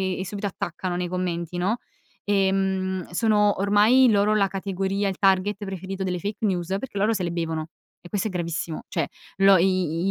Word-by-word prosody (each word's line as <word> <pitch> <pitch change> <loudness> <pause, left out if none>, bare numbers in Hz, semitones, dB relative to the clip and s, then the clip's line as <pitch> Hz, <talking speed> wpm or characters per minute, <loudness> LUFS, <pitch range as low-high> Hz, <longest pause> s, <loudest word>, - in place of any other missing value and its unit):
vi - - -6
e 190 - -3
subito 205 +1 -4
attaccano 175 -1 -4
nei 180 0 -2
commenti, 175 -1 -3
no. 200 +7 0 0.5
Ehm, 190 -2 0
sono 210 +1 +2
ormai 215 +6 +5
loro 210 0 +3
la 200 -2 +3
categoria, 195 +1 -2
il 190 - -5
target 195 +1 +2
preferito 190 0 -5
delle 180 -1 -2
fake 205 +4 -3
news 180 -4 0
perché 250 -6 -7
loro 210 +3 +2
se 190 -4 -2
le 170 - -1
bevono 160 -2 -3 0.3
e 175 - -12
questo 205 +2 -1
è - - -8
gravissimo. 170 -2 -3
Cioè 165 -5 -1 0.3
lo 195 0 +6
i 180 -1 +1
190 Hz, 185 wpm, -24 LUFS, 180-205 Hz, 0.5 s, lo